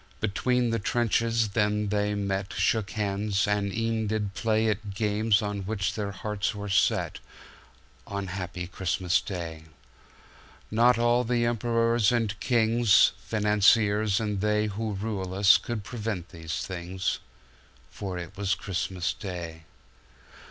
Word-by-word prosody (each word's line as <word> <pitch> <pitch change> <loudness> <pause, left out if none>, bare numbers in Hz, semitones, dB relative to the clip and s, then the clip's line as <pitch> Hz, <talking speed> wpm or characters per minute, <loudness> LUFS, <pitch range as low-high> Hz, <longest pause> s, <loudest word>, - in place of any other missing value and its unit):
"Between 120 +3 +1
the 115 - 0
trenches 115 +1 +1
then 105 0 0
they 105 0 0
met, 100 -1 -2
Shook 110 -3 +1
hands, 100 -1 -1
and 105 -1 0
e'en 115 0 -1
did 105 -2 -2
playAt 110 -2 0
games 105 0 +2
on 105 0 -2
which 100 -1 -2
their 105 -2 -3
hearts 105 +1 -3
were 105 0 -5
setOn 100 0 -3
happy 90 -1 -4
Christmas 90 0 0
Day.Not 90 +7 -3
all 120 +1 +3
the 120 0 +1
emperors 115 -1 +2
and 115 -3 0
kings, 115 -3 +4
Financiers 105 -1 +3
and 105 -3 -2
theyWho 105 0 -1
rule 95 -3 -3
us 100 +1 +6
could 120 -4 -4
prevent 105 -5 -4
these 80 -2 -5
things 95 +1 -3 0.7
—For 95 -3 -5
it 90 +2 -7
was 100 -1 0
Christmas 90 -1 -2
Day. 85 -5 -7
105 Hz, 120 wpm, -27 LUFS, 95-110 Hz, 0.7 s, us